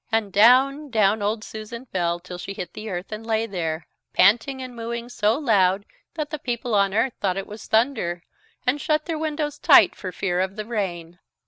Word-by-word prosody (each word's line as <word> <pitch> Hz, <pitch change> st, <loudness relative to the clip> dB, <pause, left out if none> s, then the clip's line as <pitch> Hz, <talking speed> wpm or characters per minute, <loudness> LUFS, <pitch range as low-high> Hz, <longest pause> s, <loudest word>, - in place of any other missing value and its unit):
And 220 Hz, -3 st, 0 dB
down, 265 Hz, +7 st, +5 dB
down 215 Hz, -2 st, +2 dB
old 210 Hz, +2 st, -1 dB
Susan 220 Hz, +4 st, -8 dB
fell 175 Hz, -6 st, -1 dB
till 180 Hz, 0 st, -9 dB
she 195 Hz, -, -6 dB
hit 180 Hz, -, -6 dB
the 215 Hz, 0 st, -7 dB
earth 180 Hz, +1 st, -5 dB
and 215 Hz, +1 st, -5 dB
lay 225 Hz, 0 st, 0 dB
there, 165 Hz, -6 st, -3 dB, 0.3 s
panting 240 Hz, +7 st, +4 dB
and 255 Hz, -1 st, -7 dB
mooing 235 Hz, +1 st, -5 dB
so 220 Hz, -1 st, +1 dB
loud 200 Hz, -8 st, +2 dB, 0.3 s
that 305 Hz, -2 st, -4 dB
the 305 Hz, -, -4 dB
people 240 Hz, -2 st, -3 dB
on 200 Hz, -1 st, +3 dB
earth 225 Hz, +5 st, +1 dB
thought 190 Hz, -2 st, 0 dB
it 195 Hz, -, -3 dB
was 210 Hz, +1 st, -10 dB
thunder, 220 Hz, -8 st, +1 dB, 0.4 s
and 275 Hz, +3 st, +1 dB
shut 305 Hz, +1 st, 0 dB
their 325 Hz, -3 st, -3 dB
windows 300 Hz, -2 st, -2 dB
tight -, -, +7 dB
for 185 Hz, -, -6 dB
fear 180 Hz, -1 st, -1 dB
of 190 Hz, +1 st, -1 dB
the 215 Hz, -1 st, -5 dB
rain. 175 Hz, -6 st, -4 dB
215 Hz, 200 wpm, -23 LUFS, 190-250 Hz, 0.4 s, tight